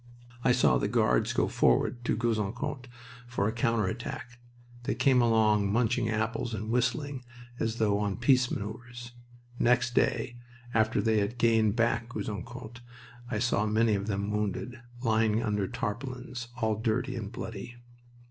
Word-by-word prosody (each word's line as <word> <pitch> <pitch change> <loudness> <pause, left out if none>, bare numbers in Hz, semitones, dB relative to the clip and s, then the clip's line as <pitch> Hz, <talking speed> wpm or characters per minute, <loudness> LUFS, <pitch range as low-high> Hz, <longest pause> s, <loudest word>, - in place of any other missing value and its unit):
I 125 - +4
saw 70 - +4
the - - 0
Guards - - +2
go - - +1
forward 120 - +2
to 110 - +1
Gouzeaucourt 120 +4 -2 0.4
for 120 -4 0
a - - +1
counter 115 -2 +1
attack. 120 +3 -5 0.5
They - - 0
came 130 -3 +4
along 110 -3 +3
munching 115 +1 +1
apples 110 +1 -1
and 110 +2 -4
whistling, 125 +3 0 0.4
as 110 0 -1
though 105 -3 +2
on 100 -2 -1
peace 130 -2 +4
maneuvers. 120 +3 -6 0.5
Next 125 0 +3
day, 120 -1 +1 0.4
after 110 0 +2
they 110 -1 +3
had 105 +4 -2
gained 115 -2 +3
back 115 0 +1
Gouzeaucourt, 115 +2 -6 0.5
I 115 - -1
saw 110 -2 +1
many 110 +1 +3
of 100 0 -1
them 100 0 -1
wounded, 105 +4 -2 0.2
lying 110 -1 +2
under 105 -3 0
tarpaulins, 125 +1 -5
all 110 -3 0
dirty 125 +4 -1
and 110 -4 -5
bloody. 115 +2 -7
115 Hz, 150 wpm, -29 LUFS, 105-120 Hz, 0.5 s, I